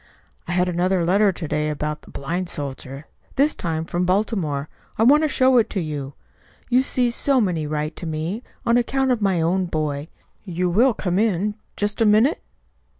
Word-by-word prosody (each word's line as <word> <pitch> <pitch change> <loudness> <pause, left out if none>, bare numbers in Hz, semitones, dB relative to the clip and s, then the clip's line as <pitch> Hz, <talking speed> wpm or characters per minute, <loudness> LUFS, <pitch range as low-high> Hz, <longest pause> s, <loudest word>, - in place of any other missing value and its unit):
"I 175 - -2
had 180 0 +2
another 180 0 +1
letter 200 +3 +4
to 175 -3 -6
day 150 +1 -1
about 150 0 -4
a - - -12
blind 175 +6 -3
soldier 135 -1 -5 0.3
this 290 +3 +3
time 160 -2 -3
from 175 +2 -1
Baltimore. 180 -7 0 0.3
I 220 - +3
want 285 +6 +6
to 310 - +1
show 260 -2 +4
it 225 - +1
to 195 - -2
you. 145 -4 -5 0.6
You 250 +2 +5
see, 250 -2 +1
so 270 +2 +2
many 175 -8 0
write 150 +1 -3
to 170 - -5
me, 160 +8 -3 0.2
on 235 +1 +4
account 265 +2 +1
of 240 -3 0
my 190 -4 +2
own 180 +3 +1
boy. 150 -2 -2 0.4
You 180 -2 -1
will 235 +6 +4
come 180 -1 -1
in, 210 -1 +1 0.2
just 205 +2 -1
a 225 - +5
minute?" 220 +9 +4
180 Hz, 190 wpm, -22 LUFS, 155-225 Hz, 0.6 s, want